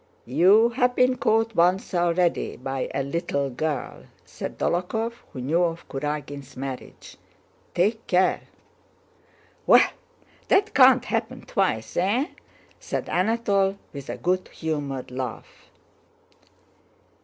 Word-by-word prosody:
"You 185 - +5
have 250 +1 +1
been 255 0 +3
caught 225 +1 +1
once 180 +2 +2
already 175 0 +1
by 135 +1 -3
a 140 - -1
'little 140 -2 -2
girl,'" 150 +3 -4 0.2
said - - -7
Dólokhov 220 +7 -1 0.2
who 130 - -7
knew 155 +7 +1
of 170 -1 -2
Kurágin's 145 -1 -5
marriage. 135 -1 -7 0.6
"Take 215 +6 +1
care!" 185 0 +2 1.3
"Well, - - +6 0.6
that 395 +2 +3
can't - - +6
happen - - -2
twice! - - -1
Eh?" 220 - +1 0.5
said - - -4
Anatole, 200 -1 +1 0.2
with 140 -2 -8
a - - -4
good 185 +1 0
humored 145 -5 -4
laugh. 125 -3 -7
175 Hz, 110 wpm, -25 LUFS, 140-210 Hz, 1.3 s, Well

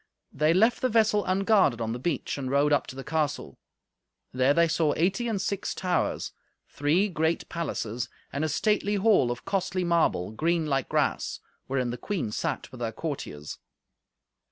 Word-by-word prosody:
They 155 +3 +3
left 220 +7 +3
the 255 - +2
vessel 215 -2 +3
unguarded 195 - +3
on 115 -1 -2
the 120 - -5
beach, 145 0 -2
and 135 -2 -4
rode 140 +2 +3
up 145 - +1
to - - -8
the 135 - -6
castle. 150 - -2 0.7
There 130 +2 +3
they 170 +3 +4
saw 155 -2 +1
eighty 195 +8 +1
and 220 -4 -1
six 200 +1 -2
towers, 180 -1 -1 0.4
three 155 +8 +1
great 165 -3 -1
palaces, 125 -9 -3 0.2
and 140 +2 -1
a 155 - 0
stately 210 +6 +1
hall 200 - +4
of 120 0 -5
costly 190 -2 -1
marble, 170 - +1
green 165 +7 0
like 135 -3 -1
grass, - - 0 0.3
wherein 130 -2 -1
the 120 - -6
queen 185 - -3
sat - - -3
with 125 -2 -10
her 115 -1 -1
courtiers. 95 - -6
160 Hz, 170 wpm, -27 LUFS, 130-190 Hz, 0.7 s, they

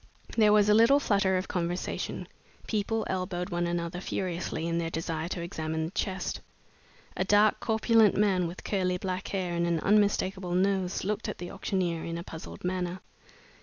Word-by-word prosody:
There 215 -2 +5
was 210 -1 +5
a 210 - +6
little 230 +6 +6
flutter 200 -7 +2
of 185 - -3
conversation. 175 0 -3 0.4
People 220 +1 -1
elbowed 185 0 -3
one 175 0 0
another 170 +1 -2
furiously 175 -3 -3
in 170 0 0
their 165 -1 -1
desire 165 0 -3
to 175 -1 -4
examine 160 -1 -3
the 160 - -5
chest. 190 -1 -2 0.7
A - - +1
dark, 205 +2 +4
corpulent 220 -1 +3
man, 190 -4 +3
with 170 +2 -8
curly 185 -3 0
black 185 0 -3
hair 185 -3 -2
and 170 0 0
an 170 -1 +1
unmistakable 195 -3 +2
nose, 190 0 +1
looked 210 +2 -2
at - - -5
the 175 0 -7
auctioneer 185 -4 -1
in 165 0 -4
a 170 - -5
puzzled 160 -2 -9
manner. 180 0 -2
185 Hz, 170 wpm, -29 LUFS, 170-200 Hz, 0.7 s, a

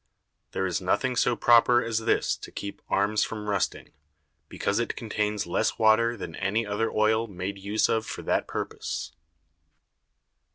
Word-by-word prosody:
There 95 - -1
is 90 0 -1
nothing 125 +7 0
so 120 0 +2
proper 120 +1 +5
as 115 -1 -1
this 115 0 +1
to - - -11
keep 100 0 -7
Arms 100 +2 +2
from 105 -1 -5
rusting, 100 -1 -2 0.6
because 100 +2 -1
it 120 - -2
contains 105 -2 -2
less 85 - 0
Water 115 +2 +4
than 85 -5 -7
any 105 +4 0
other 105 +2 -1
Oil 110 +1 +2
made 95 0 -5
use 100 +3 +1
of 110 -1 +1
for - - -7
that - - 0
purpose. 80 +1 -4
110 Hz, 155 wpm, -27 LUFS, 100-115 Hz, 0.6 s, proper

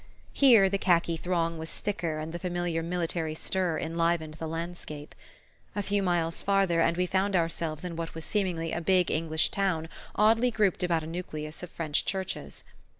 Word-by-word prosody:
Here 235 -8 +7
the 195 +1 0
khaki 170 -3 +3
throng 165 -1 -1
was 160 0 -5
thicker 170 -6 -2
and 155 +1 -5
the 175 - -4
familiar 175 -2 -1
military 165 -2 -2
stir 180 -1 0
enlivened 165 -1 0
the 160 +1 -5
landscape. 165 -2 -6 0.6
A 205 - -1
few 205 +1 +1
miles 175 -3 0
farther, 195 -4 +3
and 170 - +2
we 180 - +2
found 190 +2 +1
ourselves 165 -1 -1
in 175 -2 -4
what 165 0 -5
was 160 - -5
seemingly 175 -6 -1
a 170 - -2
big 180 0 +3
English 160 0 +1
town 180 -5 0 0.3
oddly 225 +4 +4
grouped 210 -5 +1
about 170 -3 +1
a - - -5
nucleus 155 -2 -6
of 180 - -7
French 155 -3 -1
churches. 190 -1 -4
170 Hz, 175 wpm, -29 LUFS, 165-190 Hz, 0.6 s, Here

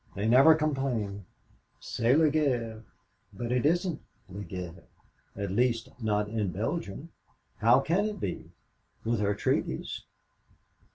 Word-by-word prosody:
They 100 +2 -1
never 135 +7 +7
complain, 140 -4 0
only 100 -2 -4 0.6
say, 115 +2 +1
'C'est - - +5
la 155 0 +5
guerre,' 120 -7 0 0.5
but 120 +4 -4
it 125 +3 +2
isn't 175 +1 0 0.3
la 95 +2 -7
guerre 90 -2 -7 0.5
at 100 -2 -3
least, 120 +2 +1
not 105 -1 +1
in 105 -3 -1
Belgium. 115 - -4 0.5
How - - +5
can 185 +6 +1
it 210 -1 -3
be, 90 - -4 0.5
with 115 0 0
her 100 -1 +1
treaties! - - -1
115 Hz, 135 wpm, -29 LUFS, 100-150 Hz, 0.6 s, never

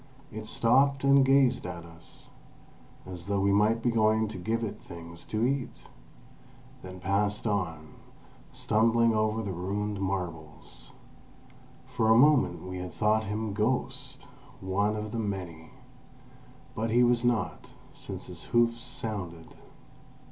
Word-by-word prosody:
It 110 -1 -7
stopped 135 +5 +3
and 140 0 +6
gazed 135 -1 +4
at 85 -1 -6
us, 85 0 -14 0.7
as 90 -1 -8
though 100 0 0
we 100 +1 +2
might 110 +3 +3
be 120 - +2
going 110 -1 +3
to 105 - -7
give 115 +5 -1
it 110 - -5
things 85 0 -10
to 110 +2 -1
eat, 135 0 0 1.1
then 95 0 -9
passed 100 +3 0
on, 80 -7 -2 0.6
stumbling 115 +1 +2
over 110 +1 0
the 100 - -3
ruined 100 +3 -3
marbles. 80 -9 -5 0.9
For 110 -2 0
a 110 - +7
moment 120 - +4
we 90 0 -6
had 90 -2 -6
thought 110 +1 +2
him 105 +1 -3
ghost—one 105 -2 -2
of 105 0 -5
the 115 - -3
many. 90 -6 -5 1.0
But 115 -2 -2
he 120 +2 +4
was 120 -1 +3
not, 110 -9 0 0.3
since - - -8
his - - -8
hoofs 115 0 +2
sounded. 90 -7 -5
105 Hz, 135 wpm, -28 LUFS, 90-115 Hz, 1.1 s, a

